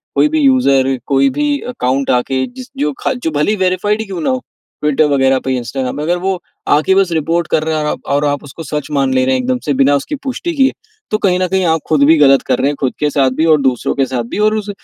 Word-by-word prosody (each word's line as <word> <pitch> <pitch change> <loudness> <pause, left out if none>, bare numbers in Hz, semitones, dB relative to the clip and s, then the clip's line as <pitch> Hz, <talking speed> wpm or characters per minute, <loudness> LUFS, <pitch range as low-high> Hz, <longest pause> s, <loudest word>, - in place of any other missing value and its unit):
कोई 300 - +3
भी 315 +1 0
यूज़र 140 - +3
कोई 135 0 +3
भी 295 -1 0
अकाउंट 135 - -1
आके 130 +1 0
जिस 255 0 -10
जो 150 +1 0
ख - - 0
जो 160 - 0
भले 150 +6 +1
ही 215 - -1
वेरिफाइड 205 +4 0
क्यों 190 -4 -6
ना - - 0
हो, 260 - -1 0.4
ट्विटर 150 0 +2
वगैरह 135 -1 +2
पे, 130 0 -2
इंस्टाग्राम 125 +2 -4
पे, 150 - -3
अगर 175 +3 0
वो 190 +1 -2 0.3
आके 155 +6 +3
बस 190 -3 +2
रिपोर्ट 165 +1 0
कर 155 - +2
रहा 160 0 -1
है 150 - -2
आप - - -3
और 145 +1 +1
आप 145 0 -1
उसको 145 +3 -9
सच 150 -1 -4
मान 135 -2 +1
ले 130 0 +2
रहे 130 0 +2
हैं 130 - 0
एकदम 125 0 -1
से 145 - +1
बिना 140 +1 +3
उसकी 285 - -3
पुष्टि 280 +6 -3
किए, 270 -1 +3 0.4
तो 215 - +2
कहीं 185 -3 +1
न 185 - +1
कहीं 190 0 0
आप 160 -1 +1
खुद 150 -3 +3
भी 160 +2 +5
गलत 135 -2 +5
कर 130 - +1
रहे 135 - +1
हैं, 145 - -1
खुद 130 - 0
के 150 - +1
साथ 135 -3 +1
भी - - +3
और 150 - +2
दूसरों 130 -3 0
के 135 - +1
साथ 125 -2 -3
भी - - -3
और 215 - -2
उस, 210 -1 -4
150 Hz, 270 wpm, -15 LUFS, 135-190 Hz, 0.4 s, भी